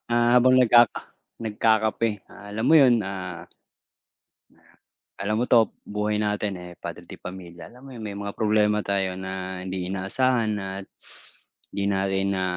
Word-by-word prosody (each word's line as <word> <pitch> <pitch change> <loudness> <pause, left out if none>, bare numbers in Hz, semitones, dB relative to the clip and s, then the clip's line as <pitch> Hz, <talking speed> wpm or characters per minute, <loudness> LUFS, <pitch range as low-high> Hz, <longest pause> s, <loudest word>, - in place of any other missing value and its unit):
ah, 120 0 +3
habang 130 +1 +6
nagkaka 120 -2 +5 0.4
nagkakape. 110 +1 +1 0.2
Ah, 100 0 -12
alam 110 +3 -3
mo 160 - +6
yun, 120 -3 +5
ah 90 -3 -6 1.7
Alam 105 +3 0
mo - - +2
'to 115 -3 +4
buhay 105 +1 -2
natin, 105 -1 -1
eh, 90 - -9
padre - - -7
de - - -12
pamilya 90 -2 -9
alam 125 +1 -16
mo 135 - -12
yung 115 -4 -7
may 100 - -5
mga 100 0 -6
problema 105 -1 +2
tayo 95 -2 -1
na 95 0 -5
hindi 90 -1 -4
inaasahan 110 +4 +1
at 95 0 -6 0.9
hindi 100 - -1
natin 95 0 0
na 95 - -1
105 Hz, 155 wpm, -25 LUFS, 95-115 Hz, 1.7 s, habang